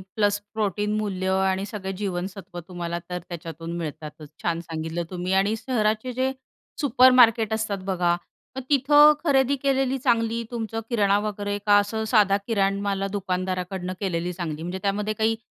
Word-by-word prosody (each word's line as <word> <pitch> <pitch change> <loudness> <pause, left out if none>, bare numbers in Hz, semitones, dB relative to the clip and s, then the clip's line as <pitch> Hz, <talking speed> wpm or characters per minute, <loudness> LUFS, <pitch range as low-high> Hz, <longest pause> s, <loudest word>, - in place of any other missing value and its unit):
Plus 205 -1 +2
protein 210 -1 -1
मूल्य 190 -3 -2 0.2
आणि 190 +1 0
सगळे 195 -3 -4
जीवनसत्व 185 -1 -4
तुम्हाला 170 -1 -4
तर 180 0 -3
त्याच्यातून 165 -1 -7
मिळतातच. 155 -1 -7
छान 170 -1 0
सांगितलं 160 +1 -3
तुम्ही. 180 0 -3
आणि 205 +3 +1
शहराचे 225 0 -1
जे 265 0 +2 0.5
सुपरमार्केट 245 -4 +5
असतात 220 -2 -1
बघा 175 -1 +2 0.4
मग - - -2
तिथं 290 +2 +6
खरेदी 275 -2 +3
केलेली 270 -1 +1
चांगली 230 -2 +1
तुमचं 225 -1 -3
किराणा 205 -4 +3
वगैरे 205 0 -3
का 205 0 +6
असं 220 +2 -2
साधा 205 -4 +5
किराण 200 -3 +1
मलाला 195 -1 -1
दुकानदाराकडनं 185 -1 -3
केलेली 180 -3 -2
चांगली? 165 -3 -5
म्हणजे 180 +2 -4
त्यामध्ये 205 +2 0
काही 220 +1 +1
200 Hz, 145 wpm, -24 LUFS, 180-225 Hz, 0.5 s, तिथं